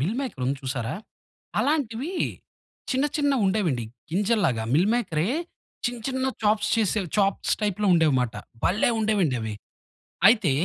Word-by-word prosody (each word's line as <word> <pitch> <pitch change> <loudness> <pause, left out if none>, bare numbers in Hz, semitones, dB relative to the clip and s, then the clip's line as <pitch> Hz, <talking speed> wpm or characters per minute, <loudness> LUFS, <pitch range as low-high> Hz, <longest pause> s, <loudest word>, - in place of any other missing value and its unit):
Meal 180 - 0
maker 250 - -5
ఉంది 140 +1 0
చూసారా! 130 -3 -3 0.7
అలాంటివీ 285 +1 -1 0.8
చిన్న 265 +1 +1
చిన్నవుండేవండి. 205 - +1 0.3
గింజలలాగా 190 - +1
మిల్ 180 +6 +4
మేకరే, 185 -7 0 0.6
చిన్న 240 -1 -1
చిన్న 260 0 0 0.2
చాప్స్ 210 0 +2
చేసే 215 -1 +1 0.2
చాప్స్ 195 -1 +1
టైప్‌లో 210 0 0
ఉండేవిమాట 130 -9 +2 0.3
భల్లే 205 +6 +3
ఉండేవండి 200 - +2
అవి. 110 -1 -4 0.8
అయితే 215 - +3
205 Hz, 120 wpm, -25 LUFS, 150-235 Hz, 0.8 s, మిల్